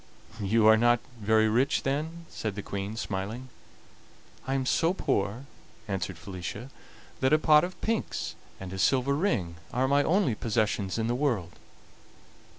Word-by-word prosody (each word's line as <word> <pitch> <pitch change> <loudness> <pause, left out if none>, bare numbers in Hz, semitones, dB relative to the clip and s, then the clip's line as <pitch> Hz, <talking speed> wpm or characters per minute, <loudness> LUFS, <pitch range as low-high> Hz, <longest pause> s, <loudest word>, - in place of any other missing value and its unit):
"You 105 +2 +2
are 110 0 +8
not 120 +1 +4 0.2
very 110 +1 +3
rich, 125 +6 +2
then?" 160 +5 -2
said 105 -3 -4
the 100 - -5
Queen, 100 +2 -4
smiling. 110 +5 -4 1.0
"I 135 - 0
am 135 -1 0
so 165 +7 +2
poor," 105 - -1 0.4
answered 95 -3 -3
Felicia, 95 +8 -7 0.5
"that 130 +2 +2
a - - +7
pot 155 -1 +5
of 185 +1 -5
pinks 225 0 -2 0.3
and 95 -1 -7
a 95 - -5
silver 130 +9 +3
ring 105 - -1
are 130 +1 +1
my 140 +1 +4
only 165 - +2
possessions 105 -3 -1
in 110 - 0
the 120 - 0
world." 120 - 0
115 Hz, 155 wpm, -28 LUFS, 100-140 Hz, 1.0 s, are